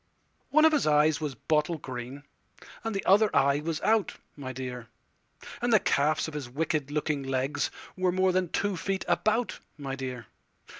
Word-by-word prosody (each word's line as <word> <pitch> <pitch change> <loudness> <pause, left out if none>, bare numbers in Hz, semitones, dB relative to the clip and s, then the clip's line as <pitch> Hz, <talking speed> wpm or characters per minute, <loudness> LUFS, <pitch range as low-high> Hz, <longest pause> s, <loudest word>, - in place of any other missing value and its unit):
One 310 +2 +5
of 320 - +6
his 300 - +2
eyes 150 +1 +4
was 145 -4 -3
bottle 155 +2 0
green, 130 0 -7 0.6
And 225 -2 -3
the 195 - -2
other 210 +3 +5
eye 140 +1 +4
was 160 +1 -3
out, 215 -2 +2 0.2
my 135 -3 -6
dear; 125 -2 -6 0.7
And 240 0 +1
the 220 - +6
calves 155 -1 +1
of 160 - -7
his 145 -5 -5
wicked 150 +1 -1
looking 150 -1 -1
legsWere 145 +7 -2
more 185 +1 +2
than 185 -1 0
two 205 +2 0
feet 195 +3 -2
about, 220 0 +1 0.2
my 135 -2 -4
dear. 130 -3 -5
155 Hz, 165 wpm, -28 LUFS, 135-190 Hz, 0.7 s, of